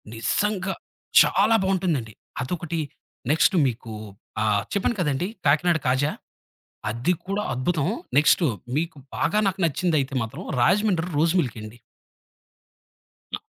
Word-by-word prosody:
నిజంగా 195 - 0 0.5
చాలా 225 - +4
బావుంటుందండి. 175 - 0 0.3
అదొకటి, 170 +3 -3 0.5
నెక్స్ట్ 160 +5 +3
మీకు 115 -2 -5 0.5
ఆహ్, 105 -2 +2
చెప్పాను 200 +3 +1
కదండీ 150 +1 0 0.2
కాకినాడ 160 +4 +4
కాజా. 130 +4 +2 0.8
అది 120 +11 0
కూడా 200 +2 -1
అద్భుతం. 140 +4 0 0.3
నెక్స్ట్ 150 +5 +5 0.3
మీకు 165 +1 -1 0.2
బాగా 210 - +1
నాకు 195 0 0
నచ్చింధైతే 155 -4 0
మాత్రం 110 - -6 0.2
రాజమండ్రి 185 - +2
రోస్ 160 +3 +3
మిల్క్ 125 -9 -1
అండి. 110 +2 -10 1.6
ఆ! - - -6
160 Hz, 110 wpm, -24 LUFS, 130-185 Hz, 1.6 s, నెక్స్ట్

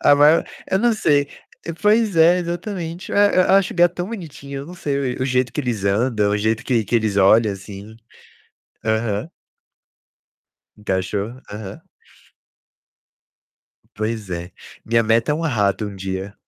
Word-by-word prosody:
A 145 - +6
maior 150 +3 +5 0.3
eu 190 - +2
não 240 +2 +3
sei 145 -8 +2 0.5
Pois 210 -3 +3
é, 170 +3 +6
exatamente, 175 0 -5
e - - -3
eu 205 -2 +4
acho 195 - +1
gato 175 0 +3
tão 175 +1 -3
bonitinho. 140 -9 -7
Não 180 - -10
sei, 140 -6 -2
o - - -3
o - - 0
jeito 125 -2 0
que - - -2
eles 115 -7 -3
andam, 105 +1 +1
o 105 - +1
jeito 110 +1 -1
que 115 -4 +1
que 120 - -4
eles 110 -3 +1
olham, 105 +2 +5
assim. 100 +2 -10 0.9
Aham. 110 - -1 1.5
Encaixou? 100 +4 -3
Aham. 105 -2 -8 2.1
Pois 110 -2 -4
é. 85 +1 -5 0.3
Minha 115 0 +2
meta 115 +5 +2
é - - +1
um 160 - -3
rato 105 - 0
um 100 - -7
dia. 95 +1 -5
120 Hz, 150 wpm, -20 LUFS, 105-165 Hz, 2.1 s, A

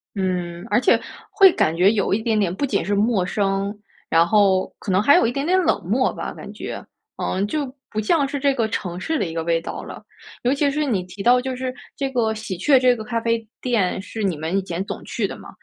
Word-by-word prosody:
嗯， 180 -2 -2
而 - - +3
且 - - +4 0.3
会 385 -2 +7
感 160 - +1
觉 185 +4 +5
有 205 -4 0
一 220 - +1
点 220 -1 +1
点 195 -4 +1
不 280 - -1
仅 215 -7 0
是 205 - -1
陌 205 -2 +2
生， 195 +1 -1 0.4
然 165 +1 +4
后 195 -2 +3
可 195 - -4
能 185 +1 +3
还 285 +7 +6
有 - - +4
一 230 - +1
点 275 +3 -2
点 370 +2 +3
冷 325 - +1
漠 255 +6 +2
吧， - - -5
感 - - -9
觉。 - - -6 0.3
嗯， 190 +2 -1
就 300 +4 -1 0.2
不 215 - -2
像 285 +6 +2
是 280 +1 -3
这 280 0 +2
个 230 -4 +1
城 180 -4 -4
市 320 +11 -1
的 - - 0
一 165 - -5
个 165 - -2
味 165 0 +1
道 - - -6
了。 - - -9 0.4
尤 250 +2 +3
其 285 0 +2
是 300 +1 0
你 215 -10 0
提 185 +2 -9
到 250 +1 +5
就 260 +1 -3
是 255 0 -3 0.2
这 275 -1 -2
个 230 -4 0
喜 215 -4 -5
鹊 275 +8 +4
这 250 -1 +4
个 220 - -6
咖 230 +1 -2
啡 230 -1 -1
店 215 -8 0
是 220 +2 -7
你 185 -5 +1
们 160 +5 -2
以 - - +1
前 180 0 -3
总 - - -6
去 - - -2
的 - - -8
嘛， - - -12
215 Hz, 270 characters per minute, -22 LUFS, 185-255 Hz, 0.4 s, 会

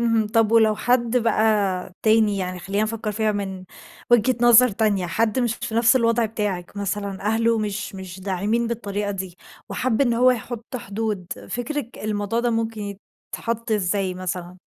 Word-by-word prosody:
اهم، 230 -2 +2
طَب 225 0 +2
ولو 220 -2 +5
حد 245 0 +1
بقى 210 -5 +1
تاني، 215 -2 +4
يعني 185 -1 -3
خلينا 195 +5 -1
نفكر 215 -1 -2
فيها 215 0 0
من 190 -2 -4 0.5
وجهة 240 +2 +4
نظر 240 +1 +7
تانية، 205 -3 0
حد 220 +6 0
مش 240 -3 +1
في 225 - -6
نفْس 235 +3 +5
الوضع 230 -1 +2
بتاعِك 205 -4 -3
مثلًا، 200 -1 -3
أهله 225 +2 +2
مش 210 -1 -3
مش 190 -1 -8
داعمين 205 +5 0
بالطريقة 205 -3 -3
دي، 190 -2 -5 0.3
وحَب 250 -2 -1
إن 240 -4 +3
هو 250 +2 +5
يحط 240 +1 -4
حدود، 210 -4 -3 0.2
فكركِ 245 +1 -4
الموضوع 210 +1 -1
ده 240 0 +1
ممكن 225 -3 -3 0.4
يتحط 230 0 -4
إزاي 195 -2 0
مثلًا؟ 180 -1 -5
215 Hz, 160 wpm, -23 LUFS, 195-230 Hz, 0.5 s, نظر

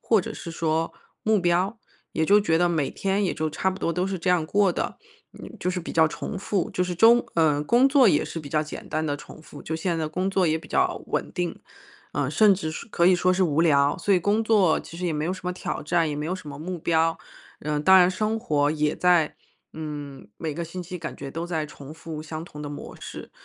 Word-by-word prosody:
或 220 -4 +3
者 - - -6
是 170 - -7
说 165 0 -1 0.3
目 215 -2 +3
标， 180 +5 +1 0.3
也 160 - 0
就 205 +5 +5
觉 165 -5 +2
得 175 - +3
每 155 -5 0
天 195 +1 0
也 180 - 0
就 155 -1 -2
差 190 +5 0
不 190 - -6
多 170 - -1
都 180 - 0
是 190 -1 -3
这 175 +2 -3
样 175 -3 +3
过 200 +2 +2
的， - - -3 0.4
嗯， - - -10
就 180 - 0
是 180 - -2
比 165 - -6
较 160 -1 +4
重 200 - -5
复。 195 -1 -1
就 180 - 0
是 180 0 -2
中 235 +4 +6
呃， 150 -3 +3
工 245 - +4
作 270 -5 +6
也 150 - +3
是 165 - -5
比 145 - -9
较 150 +1 +1
简 150 - -9
单 155 +1 -1
的 145 -1 -1
重 155 - -12
复， 150 -2 -12
就 160 - -3
现 170 +1 -1
在 160 -1 -2
工 185 +4 -1
作 190 -1 +2
也 160 +1 +1
比 - - -13
较 - - +1
稳 - - -2
定， 175 -2 -3 0.5
嗯， 140 -2 -1
甚 210 +5 +5
至 180 -4 -4
是 195 - -7
可 170 -4 +2
以 185 - +6
说 185 +1 +2
是 185 +1 +1
无 155 -1 +1
聊， 145 -3 +3
所 205 - +1
以 185 - +5
工 205 +5 +1
作 200 -7 +4
其 165 - -11
实 180 - -2
也 170 - 0
没 150 0 -2
有 180 - -1
什 185 - -7
么 180 - -1
挑 180 - -4
战， 165 +1 +1
也 145 - -3
没 150 - -3
有 180 - -1
什 185 -5 -9
么 140 0 -8
目 175 +2 -5
标。 165 0 +1 0.4
嗯， 150 -1 -2
当 190 +4 +7
然 180 0 +5
生 215 +4 -1
活 145 -6 +1
也 150 -1 0
在 175 -4 +3 0.4
嗯， 145 -3 -7
每 160 -2 -3
个 170 +2 -3
星 180 +3 -6
期 180 +1 -7
感 165 - -6
觉 140 -1 -7
都 165 +3 -4
在 160 -3 -2
重 145 0 -11
复 160 -1 -7
相 155 0 -6
同 150 -3 -11
的 145 - -5
模 145 - -8
式， - - -9
170 Hz, 275 characters per minute, -25 LUFS, 155-185 Hz, 0.5 s, 当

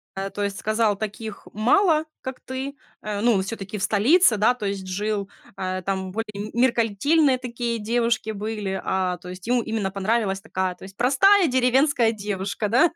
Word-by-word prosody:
Э, 195 +1 -3
то 205 - -4
есть, 200 0 -3
сказал, 215 -1 +1
таких 215 0 -6
мало, 310 - +3 0.2
как 260 0 -6
ты 265 +2 -5 0.3
э, 210 -1 -3
ну, 225 -5 +3
всё-таки 200 0 -5
в 190 - -4
столице, 230 - +4
да, 220 +4 +4
то 235 -4 -6
есть, 195 -1 -3
жил, 205 +1 -2 0.3
а, 185 0 -3
там 190 0 -3
более 210 0 -5
меркантильные 255 +4 +3
такие 240 -2 -3
девушки 230 0 0
были, 210 -2 -3
а, 185 -1 0
то 180 +1 -11
есть, 185 +3 -9
ему 245 0 +2
именно 220 -4 -2
понравилась 195 0 0
такая, 185 -4 -2
то - - -16
есть, 195 +1 -12
простая 365 +10 +5
деревенская 255 -1 +3
девушка, 205 -1 -3
да, 260 +10 +4
215 Hz, 170 wpm, -24 LUFS, 195-245 Hz, 0.3 s, простая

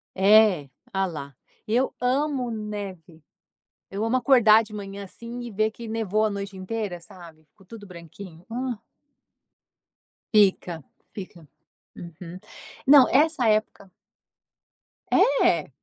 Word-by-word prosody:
É, 195 -6 +4 0.3
olha 195 0 +1
lá, 140 -6 -7 0.3
eu 245 +5 +1
amo 260 0 0
neve, 200 -7 -7 0.7
eu 200 +2 -4
amo 225 +3 +1
acordar 230 -4 +5
de 215 -1 -13
manhã 200 -1 -7
assim 235 +5 -9
e 240 -1 -7
ver 215 +2 0
que 230 +1 -10
nevou 220 -1 0
a - - +1
noite 200 -1 -6
inteira 190 -1 -5
sabe, 170 -2 -14
ficou 195 - -23
tudo 205 0 -12
branquinho. 170 0 -12
Ah. 245 0 -3 1.6
Fica, 190 -6 +2 0.3
fica. 180 -5 -10 0.5
Uhum. 170 +1 -10 0.5
Não, 280 -2 +8
essa 295 -3 +2
época. 215 -3 -1 1.2
É? 170 - +3
210 Hz, 120 wpm, -24 LUFS, 180-230 Hz, 1.6 s, Não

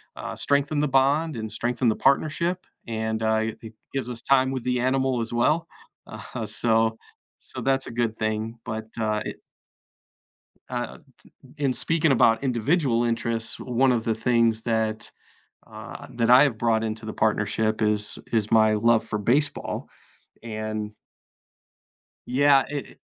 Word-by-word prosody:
uh, - - -6
strengthen 145 +2 +1
the 150 - +2
bond 140 +4 +2
and 110 -1 -5
strengthen 120 +2 0
the 110 - +1
partnership, 160 +6 +1 0.2
and, 110 -1 -2
uh, 110 0 +2 0.2
it 110 -1 -10 0.2
gives 135 -3 -2
us 120 -1 -5
time 130 -1 +3
with 130 -3 -3
the 125 -1 0
animal 130 0 +1
as 115 +1 -4
well. 155 +8 +2 0.4
Aha, - - -7
so, 115 -1 +1 0.4
so - - -8
that's 135 0 +1
a - - -6
good 115 -1 -1
thing, 110 +1 -2
but, 110 0 -4 0.2
uh, 110 -1 0
it - - -5 1.3
uh, - - -4
t - - -23 0.6
in 140 -3 +1
speaking 160 +4 +1
about 115 -2 +4
individual 125 0 +1
interests, 115 -1 -2
one 125 +1 +2
of 115 -2 -1
the 115 - +1
things 115 -1 +2
that 110 -2 -1 0.6
uh, - - -10
that 120 -1 0
I 125 +3 +8
have 135 -7 +1
brought 115 -1 +1
into 110 0 -4
the 110 - -5
partnership 110 +1 0
is 105 -1 +1
is 110 -2 0
my 110 -1 +5
love 110 +1 +3
for 110 -1 -3
baseball, 135 +8 0 0.5
and 110 -1 -4 1.4
yeah, 135 +1 +4
i - - -4
i 145 - -6
115 Hz, 155 wpm, -25 LUFS, 110-135 Hz, 1.4 s, I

